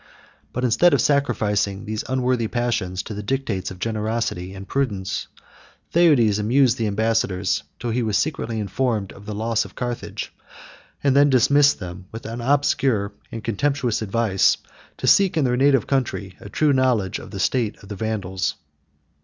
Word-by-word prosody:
But 125 Hz, -, -3 dB
instead 130 Hz, +9 st, +4 dB
of -, -, +1 dB
sacrificing 105 Hz, -8 st, +1 dB
these 110 Hz, 0 st, -3 dB
unworthy 125 Hz, -3 st, +1 dB
passions 110 Hz, -6 st, -1 dB
to -, -, -7 dB
the 105 Hz, -, -5 dB
dictates 110 Hz, -5 st, -2 dB
of 95 Hz, -, -9 dB
generosity 110 Hz, -3 st, -2 dB
and 95 Hz, 0 st, -9 dB
prudence, 105 Hz, -9 st, -2 dB, 0.7 s
Theudes 135 Hz, -12 st, +4 dB
amused 120 Hz, +3 st, +3 dB
the 110 Hz, -, +1 dB
ambassadors 105 Hz, -2 st, 0 dB, 0.2 s
till 120 Hz, 0 st, -3 dB
he 125 Hz, +2 st, 0 dB
was 110 Hz, -3 st, +1 dB
secretly 115 Hz, -3 st, -2 dB
informed 105 Hz, 0 st, -1 dB
of 100 Hz, +1 st, -14 dB
the 105 Hz, -, -4 dB
loss 115 Hz, +1 st, 0 dB
of -, -, -13 dB
Carthage, 120 Hz, -1 st, -5 dB, 0.7 s
and 140 Hz, -2 st, +3 dB
then 145 Hz, +1 st, +6 dB
dismissed 140 Hz, +3 st, +4 dB
them 90 Hz, -1 st, -8 dB
with 115 Hz, 0 st, -8 dB
obscure 120 Hz, -3 st, +1 dB, 0.2 s
and 115 Hz, -1 st, -6 dB
contemptuous 125 Hz, +1 st, 0 dB
advice, 110 Hz, -2 st, +2 dB, 0.4 s
to -, -, -4 dB
seek 195 Hz, -4 st, +4 dB
in 150 Hz, -, +3 dB
their 125 Hz, -1 st, +2 dB
native 135 Hz, -2 st, +3 dB
country 115 Hz, -9 st, -2 dB
a 100 Hz, -, -10 dB
true 150 Hz, +4 st, +2 dB
knowledge 125 Hz, -8 st, +1 dB
of -, -, -10 dB
the 100 Hz, -, -7 dB
state 115 Hz, +1 st, 0 dB
of 100 Hz, -, -13 dB
the 105 Hz, -, -5 dB
Vandals. 95 Hz, -3 st, -2 dB
115 Hz, 160 wpm, -22 LUFS, 100-130 Hz, 0.7 s, then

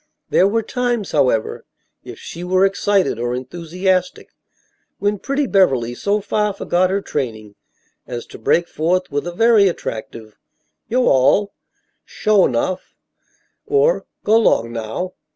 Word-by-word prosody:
There 190 Hz, -, +4 dB
were 225 Hz, +2 st, 0 dB
times, 240 Hz, -5 st, -2 dB
however, 130 Hz, -7 st, +1 dB, 0.4 s
if -, -, -10 dB
she 170 Hz, -, -8 dB
were 185 Hz, +1 st, +3 dB
excited 195 Hz, -, +1 dB
or 120 Hz, +1 st, -1 dB
enthusiastic, 175 Hz, +7 st, -2 dB, 0.7 s
when 205 Hz, 0 st, -1 dB
pretty 275 Hz, +5 st, -1 dB
Beverly 135 Hz, -, +2 dB
so 205 Hz, +10 st, -1 dB
far 210 Hz, +1 st, 0 dB
forgot 185 Hz, -1 st, 0 dB
her 195 Hz, +1 st, -1 dB
training 110 Hz, -7 st, -4 dB, 0.5 s
as 120 Hz, -1 st, -6 dB
to -, -, -12 dB
break 175 Hz, +1 st, +2 dB
forth 180 Hz, +3 st, -1 dB
with 145 Hz, +4 st, -2 dB
a -, -, -3 dB
very 220 Hz, +2 st, +4 dB
attractive 110 Hz, -, -6 dB, 0.5 s
"yo' 250 Hz, +2 st, +1 dB
all," 165 Hz, +10 st, +3 dB, 0.5 s
"suah 210 Hz, -3 st, +2 dB
'nough," 155 Hz, +10 st, -3 dB, 0.7 s
or 440 Hz, +4 st, +2 dB, 0.2 s
"go 220 Hz, +2 st, +4 dB
'long 115 Hz, -, +2 dB
naow." 115 Hz, +11 st, -4 dB
185 Hz, 135 wpm, -19 LUFS, 130-205 Hz, 0.7 s, There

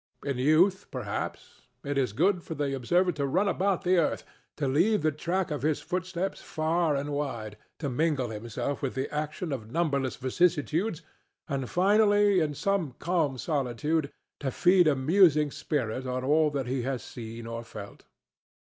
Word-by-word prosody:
In 140 Hz, -3 st, -2 dB
youth, 175 Hz, +8 st, +3 dB
perhaps, 120 Hz, -6 st, -5 dB, 0.2 s
it 145 Hz, 0 st, -2 dB
is 130 Hz, -5 st, +1 dB
good 175 Hz, -, +2 dB
for 160 Hz, -, -6 dB
the 140 Hz, -2 st, -1 dB
observer 175 Hz, +9 st, +2 dB
to 145 Hz, -4 st, -2 dB
run 185 Hz, +9 st, +1 dB
about 195 Hz, -1 st, +1 dB
the 185 Hz, 0 st, +3 dB
earth, 165 Hz, -, 0 dB, 0.3 s
to 145 Hz, -, -1 dB
leave 175 Hz, +8 st, +2 dB
the 155 Hz, -, +3 dB
track 170 Hz, +4 st, -2 dB
of 150 Hz, -, -2 dB
his 155 Hz, 0 st, +1 dB
footsteps 185 Hz, +1 st, -3 dB
far 160 Hz, 0 st, 0 dB
and 140 Hz, +1 st, -2 dB
wide, 120 Hz, -8 st, -3 dB, 0.2 s
to 150 Hz, -, -3 dB
mingle 140 Hz, -1 st, 0 dB
himself 115 Hz, +6 st, -4 dB
with 135 Hz, -, -2 dB
the 135 Hz, +2 st, -3 dB
action 155 Hz, +2 st, -3 dB
of 115 Hz, -6 st, -5 dB
numberless 140 Hz, -5 st, 0 dB
vicissitudes, 165 Hz, -, 0 dB, 0.4 s
and, 135 Hz, -3 st, -3 dB
finally, 205 Hz, +1 st, +4 dB
in 150 Hz, -3 st, 0 dB
some 180 Hz, -7 st, -1 dB
calm 165 Hz, -6 st, 0 dB
solitude 145 Hz, +2 st, -1 dB, 0.3 s
to 140 Hz, -, -2 dB
feed 180 Hz, +4 st, +4 dB
a 150 Hz, -, +4 dB
musing 150 Hz, +1 st, +4 dB
spirit 130 Hz, -4 st, -2 dB
on 130 Hz, 0 st, -2 dB
all 150 Hz, +3 st, +3 dB
that 140 Hz, -3 st, -2 dB
he 130 Hz, +1 st, -1 dB
has 130 Hz, 0 st, -3 dB
seen 115 Hz, -1 st, -8 dB
and 115 Hz, 0 st, -6 dB
felt. 100 Hz, -3 st, -10 dB
150 Hz, 165 wpm, -28 LUFS, 130-175 Hz, 0.4 s, finally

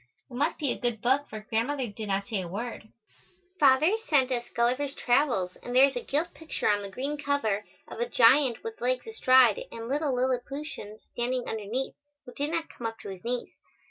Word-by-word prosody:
It -, -, -11 dB
must 290 Hz, +6 st, 0 dB
be 285 Hz, -5 st, 0 dB
a -, -, -4 dB
good 240 Hz, -3 st, -1 dB
book 265 Hz, +6 st, +1 dB
for 215 Hz, 0 st, -7 dB
Grandmother 255 Hz, +3 st, 0 dB
did 215 Hz, -1 st, -7 dB
not 195 Hz, 0 st, 0 dB
say 210 Hz, -3 st, -2 dB
a 180 Hz, -, -5 dB
word. 220 Hz, +4 st, -6 dB, 0.7 s
Father 280 Hz, +4 st, +6 dB, 0.2 s
sent 270 Hz, -4 st, +3 dB
us 240 Hz, -1 st, -2 dB
"Gulliver's 255 Hz, +4 st, +1 dB
Travels" 240 Hz, -8 st, +1 dB
and 245 Hz, -, -5 dB
there 260 Hz, +2 st, +9 dB
is 275 Hz, -1 st, -2 dB
a 245 Hz, -, -2 dB
gilt 315 Hz, +5 st, -1 dB
picture 320 Hz, -1 st, -3 dB
on 205 Hz, -1 st, +3 dB
the 200 Hz, -, -6 dB
green 275 Hz, +8 st, -3 dB
cover, 225 Hz, -8 st, 0 dB, 0.2 s
of -, -, -9 dB
a 240 Hz, -, -1 dB
giant 250 Hz, +1 st, +5 dB
with 225 Hz, 0 st, -7 dB
legs 250 Hz, +1 st, 0 dB
astride 255 Hz, -, +5 dB
and 230 Hz, 0 st, -7 dB
little 285 Hz, 0 st, 0 dB
Lilliputians 250 Hz, -3 st, -3 dB
standing 245 Hz, +1 st, -2 dB
underneath, 225 Hz, +5 st, -3 dB, 0.3 s
who 250 Hz, -, -11 dB
do 285 Hz, -, -2 dB
not 325 Hz, +1 st, -2 dB
come 235 Hz, -, -5 dB
up 225 Hz, 0 st, -6 dB
to -, -, -7 dB
his 190 Hz, -2 st, -8 dB
knees. 245 Hz, +1 st, -3 dB
245 Hz, 205 wpm, -28 LUFS, 225-280 Hz, 0.7 s, there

